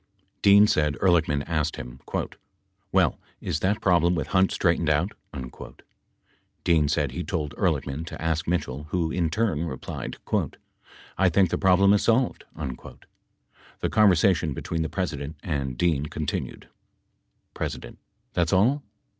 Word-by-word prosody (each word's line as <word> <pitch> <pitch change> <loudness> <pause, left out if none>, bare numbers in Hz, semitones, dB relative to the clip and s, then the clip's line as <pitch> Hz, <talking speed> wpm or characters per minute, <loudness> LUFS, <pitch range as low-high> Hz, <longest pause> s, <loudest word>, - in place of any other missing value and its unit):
Dean 100 +1 +7
said 75 -7 +1
Ehrlichman 80 -6 +2
asked 75 -2 -1
him: - - -9 0.9
"Well, - - +2 0.2
is 75 - -2
that 100 +5 0
problem 85 -1 +3
with 75 -5 -3
Hunt 95 0 +3
straightened 85 -2 +1
out?" 75 -1 +1 1.5
Dean 80 -4 +3
said 75 -3 0
he 85 +7 -4
told 80 -7 -3
Ehrlichman 75 +5 -1
to - - -7
ask 80 -1 -1
Mitchell 75 -5 -2
who, 80 0 -1
in 85 -2 0
turn, 90 -4 0
replied, 65 -5 -6 1.0
"I 95 -1 +5
think 90 0 +3
the - - +1
problem 95 +1 +5
is 105 - +3
solved." 120 +2 +1
The 65 -5 -9
conversation 90 -7 +3
between 80 +4 -3
the 80 - -2
President 80 -6 -3
and 70 -6 -3
Dean 75 -3 +1
continued: 75 -1 -4 0.9
P. - - -2 0.7
That's 85 -2 +1
all? 120 +10 +3
85 Hz, 130 wpm, -25 LUFS, 75-95 Hz, 1.5 s, Dean